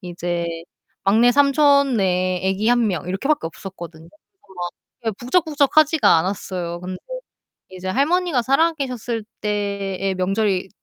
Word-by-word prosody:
이제 175 -1 -3 0.6
막내 230 +5 +4
삼촌네 265 - +3
애기 195 +4 0
1 240 -1 +3
명 180 -4 -3
이렇게 190 +9 -3
밖에 300 - +1
없었거든요. 170 -2 -10
어 310 - -23
막 175 -1 -4 0.4
예 - - +3
북적북적하지가 305 - +3
않았어요. 180 -1 -3
근데 185 +1 -6 0.7
이제 185 0 -7
할머니가 290 - +1
살아 295 +7 +3
계셨을 245 -6 -4 0.2
때의 200 -2 -2
명절이 190 0 0
200 Hz, 290 characters per minute, -21 LUFS, 185-275 Hz, 0.7 s, 막내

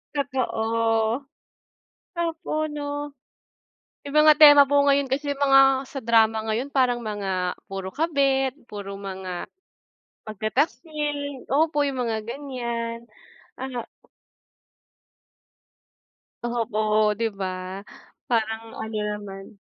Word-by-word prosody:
Totoo. 230 -4 0 1.0
Opo, 335 0 -3 0.2
'no? 290 -1 -5 0.9
Yung 285 +1 -2
mga 305 0 +8
tema 290 -2 +9
po 285 0 +4
ngayon 280 -1 +3
kasi 280 +2 -1
mga, 270 -1 +4
sa 275 - -6
drama 225 -1 +3
ngayon 255 +6 -2
parang 250 -3 +2
mga 195 -5 -2
puro 195 -1 -5
kabit 275 -4 +1 0.2
puro 200 -1 -7
mga, 190 -2 -6 0.8
pagtataksil 285 - -2
opo, 295 +1 +2
yung 260 -2 -2
mga 225 -2 -1
ganyan, 235 -3 -4 0.5
ano 255 -3 -4 2.6
Opo, 235 -2 -2 0.4
di 230 - 0
ba? 185 0 -5 0.5
Parang 220 -2 0 0.2
ano 220 0 -6 0.2
naman. 200 -1 -8
245 Hz, 95 wpm, -24 LUFS, 220-285 Hz, 2.6 s, tema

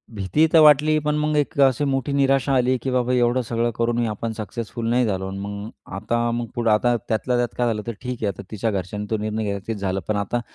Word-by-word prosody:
भीती 100 - +2
तर 165 - +8
वाटली 155 0 +6
पण 150 - +1
मग 150 0 0
एक 145 0 -1
अशी 130 +3 -1
मोठी 135 +1 -1
निराशा 135 0 +2
आली, 130 +1 +2
की 130 +1 -4
बाबा 125 0 +1
एवढं 125 0 +2
सगळं 115 0 -1
करूनही 120 0 +1
आपण 110 +1 -3
सक्सेसफुल 115 +1 -5
नाही 125 +1 +3
झालो 95 -2 -2
अन् 95 +1 -6
मग 100 +1 -6 0.3
आता 110 +4 -1
मग 120 0 -2
पुढं 120 -1 +1
आता 120 +3 +3
त्यातल्या 120 +3 0
त्यात 120 -1 -1
काय 120 -1 +1
झालं 110 -2 -1
तर 115 - -2
ठीक 125 -1 -4
आहे - - +2
आता 100 0 -4
तिच्या 110 +1 -1
घरच्याने 100 +2 -4
तो 110 - +1
निर्णय 110 +1 -2
घेतला 100 -1 -2
तेच 115 - -2
झालं. 95 -1 -2
पण 110 - 0
आता 100 +4 -1
120 Hz, 240 wpm, -22 LUFS, 105-125 Hz, 0.3 s, तर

